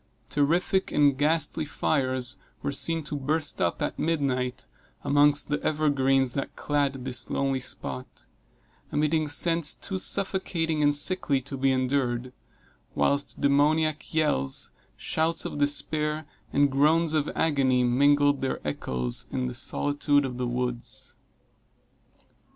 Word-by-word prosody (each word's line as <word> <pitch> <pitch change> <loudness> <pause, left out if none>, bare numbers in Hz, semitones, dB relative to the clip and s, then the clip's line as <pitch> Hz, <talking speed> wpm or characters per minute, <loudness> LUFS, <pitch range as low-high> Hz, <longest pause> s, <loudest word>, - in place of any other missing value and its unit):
Terrific 170 +6 +1
and 145 -2 +3
ghastly 155 +3 0
fires 130 -4 -1 0.3
were - - -1
seen 165 +3 -1
to 150 - -5
burst 150 +2 -2
up, 85 - 0
at - - -3
midnight, 135 -6 -1 0.4
amongst 145 0 +3
the 145 - -1
evergreens 135 -4 +1
that 135 - -4
clad 140 -3 -1
this 130 -1 -2
lonely 135 -1 0
spot, 125 0 -6 0.7
emitting 155 +1 +1
scents 165 +1 +2
too 190 -1 -5
suffocating 175 -5 0
and 145 0 +3
sickly 145 -3 +1
to 140 +2 -7
be 135 0 +1
endured; 130 -1 -1 0.6
whilst 140 0 0
demoniac 150 +2 +2
yells, 110 - 0 0.3
shouts 160 +1 0
of - - -5
despair 150 +1 +2 0.3
and 145 0 +3
groans 155 +4 +3
of 155 -1 +1
agony, 135 -5 +2
mingled 145 +3 +3
their 135 - -1
echos 60 -4 -2
in 130 -1 -2
the 125 - -3
solitude 145 +3 0
of 125 -1 -6
the 125 - -1
woods. 120 0 -4
145 Hz, 125 wpm, -26 LUFS, 130-155 Hz, 0.7 s, and